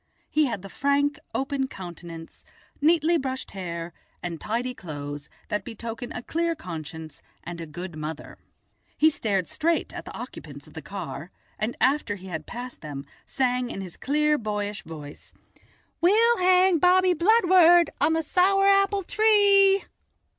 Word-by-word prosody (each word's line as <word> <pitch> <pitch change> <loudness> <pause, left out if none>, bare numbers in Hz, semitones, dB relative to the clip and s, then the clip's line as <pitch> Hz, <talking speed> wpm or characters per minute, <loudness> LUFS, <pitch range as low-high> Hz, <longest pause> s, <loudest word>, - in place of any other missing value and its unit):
He 305 0 +3
had 225 -6 -4
the - - -7
frank 280 +3 +1 0.2
open 270 0 -1
countenance, 170 -5 -10 0.4
neatly 330 +2 +4
brushed 265 -1 -4
hair 170 -3 -5 0.3
and 170 -2 -5
tidy 240 +4 -2
clothes 145 -7 -7 0.2
that 210 -2 -1
betoken 235 +1 -7
a 245 - -6
clear 335 +3 -1
conscience 160 - -8 0.2
and 170 0 -7
a 165 - -6
good 170 +3 -7
mother. 155 0 -7 0.6
He 315 +1 +5
stared 200 - -1
straight 335 +2 0
at - - -7
the - - -9
occupants - - -9
of - - -17
the - - -7
car, - - -7 0.3
and, 215 +3 -2
after 260 -6 +2
he 190 -1 -12
had 160 -3 -5
passed 245 +1 -7
them, 145 -2 -7 0.2
sang 250 -2 0
in 195 - -5
his 185 -3 -8
clear, 300 +2 +1
boyish 210 -2 -3
voice: 150 -2 -11 0.7
"We'll 450 +7 +5
hang 365 -1 +4
Bobby 365 +2 +5
Bludward 350 -2 +5
on 320 - +4
the 325 0 0
sour 390 +5 +3
apple 395 0 +3
tree." 400 -1 +4
255 Hz, 150 wpm, -25 LUFS, -, 0.7 s, He